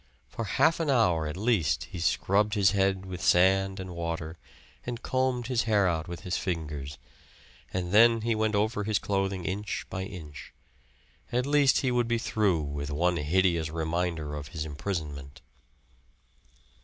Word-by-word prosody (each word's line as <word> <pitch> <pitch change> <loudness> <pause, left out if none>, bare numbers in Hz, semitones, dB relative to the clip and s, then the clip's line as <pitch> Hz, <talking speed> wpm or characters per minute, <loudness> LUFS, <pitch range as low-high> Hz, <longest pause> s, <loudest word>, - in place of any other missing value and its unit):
For 115 - -5
half 160 - +2
an 165 -3 -1
hour 90 - +3
at 75 +3 -5
least 95 - +1
he 90 - -6
scrubbed 100 +6 +1
his 100 -2 +4
head 95 -1 +1
with 90 -2 -7
sand 95 +2 +3
and 95 -1 -6
water, 85 -1 -4 0.4
and 120 0 -6
combed 130 -2 0
his 120 -2 0
hair 105 -4 +3
out 80 -2 -1
with 85 0 -7
his 90 - -2
fingers. 75 -6 -4 0.7
And 90 -1 -3
then 115 +2 +6
he 115 +1 +1
went 110 -1 0
over 105 +1 0
his 105 0 +1
clothing 95 -2 -2
inch 100 +2 -3
by 95 - -3
inch. 80 -7 -10 0.8
At 125 +1 0
least 145 -2 +4
he 130 - +1
would 120 -1 +1
be 120 0 +1
through 105 -7 +1
with 70 0 -4
one 85 +4 +1
hideous 85 +1 +1
reminder 80 -1 -2
of 75 -1 -6
his 80 -1 -5
imprisonment. 75 -3 -5
95 Hz, 160 wpm, -28 LUFS, 80-110 Hz, 0.8 s, then